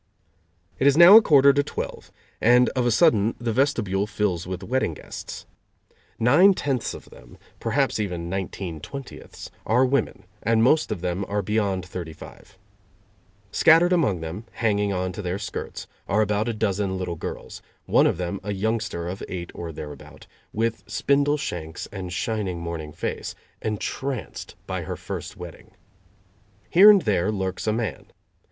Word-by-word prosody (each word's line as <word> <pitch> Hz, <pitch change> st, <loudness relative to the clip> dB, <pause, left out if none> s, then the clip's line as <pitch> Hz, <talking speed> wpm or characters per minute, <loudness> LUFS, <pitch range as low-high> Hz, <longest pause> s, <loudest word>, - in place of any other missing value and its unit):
It 135 Hz, -, +3 dB
is 140 Hz, +1 st, +4 dB
now 175 Hz, +4 st, +10 dB
a 225 Hz, -, +11 dB
quarter 140 Hz, -7 st, +6 dB
to 145 Hz, -, +3 dB
twelve, -, -, -6 dB, 0.3 s
and 125 Hz, +2 st, +5 dB
of 125 Hz, -2 st, 0 dB
a -, -, +3 dB
sudden 115 Hz, -, +3 dB
the 120 Hz, -2 st, -2 dB
vestibule 105 Hz, -7 st, +1 dB
fills 100 Hz, -5 st, -1 dB
with 90 Hz, -1 st, -5 dB
wedding 125 Hz, -10 st, -1 dB
guests. -, -, -9 dB, 0.7 s
Nine 170 Hz, -, +5 dB
tenths 135 Hz, -7 st, -2 dB
of -, -, -13 dB
them, -, -, -15 dB, 0.2 s
perhaps -, -, 0 dB
even 90 Hz, -5 st, -3 dB
nineteen 95 Hz, -2 st, -4 dB
twentieths, 135 Hz, -, -9 dB
are 125 Hz, +4 st, +3 dB
women, 130 Hz, -2 st, -1 dB, 0.2 s
and 115 Hz, 0 st, +2 dB
most 150 Hz, +6 st, +3 dB
of 95 Hz, -, -3 dB
them 90 Hz, +2 st, -2 dB
are 105 Hz, 0 st, -1 dB
beyond 100 Hz, -2 st, -1 dB
thirty 85 Hz, -3 st, -7 dB
five. -, -, -14 dB, 0.9 s
Scattered 165 Hz, +7 st, +5 dB
among 120 Hz, -, +1 dB
them, 85 Hz, +7 st, -6 dB
hanging 105 Hz, -3 st, 0 dB
on 95 Hz, -1 st, -2 dB
to 100 Hz, -, -6 dB
their 90 Hz, 0 st, -2 dB
skirts, 100 Hz, -, -6 dB, 0.2 s
are 105 Hz, +2 st, +2 dB
about 105 Hz, +2 st, 0 dB
a -, -, -1 dB
dozen 100 Hz, -3 st, -1 dB
little 90 Hz, -2 st, -3 dB
girls -, -, -7 dB, 0.2 s
one -, -, +4 dB
of -, -, 0 dB
them 90 Hz, +2 st, -3 dB
a 100 Hz, +2 st, -4 dB
youngster 105 Hz, -4 st, -2 dB
of 95 Hz, +3 st, -6 dB
eight 85 Hz, -2 st, -5 dB
or 85 Hz, -1 st, -6 dB
thereabout, 75 Hz, -2 st, -10 dB, 0.3 s
with 115 Hz, +1 st, -1 dB
spindle 145 Hz, +1 st, +1 dB
shanks 80 Hz, -, -5 dB
and 95 Hz, -3 st, -6 dB
shining 95 Hz, -1 st, -2 dB
morning 85 Hz, -2 st, -5 dB
face, -, -, -5 dB, 0.3 s
entranced 125 Hz, +5 st, -4 dB
by -, -, -3 dB
her -, -, -5 dB
first -, -, -7 dB
wedding. 85 Hz, -3 st, -10 dB, 1.0 s
Here 195 Hz, +5 st, +9 dB
and 200 Hz, -3 st, +6 dB
there 100 Hz, -2 st, +1 dB
lurks 95 Hz, -2 st, -3 dB
a -, -, +3 dB
man. 110 Hz, -5 st, -3 dB
105 Hz, 160 wpm, -24 LUFS, 90-125 Hz, 1.0 s, a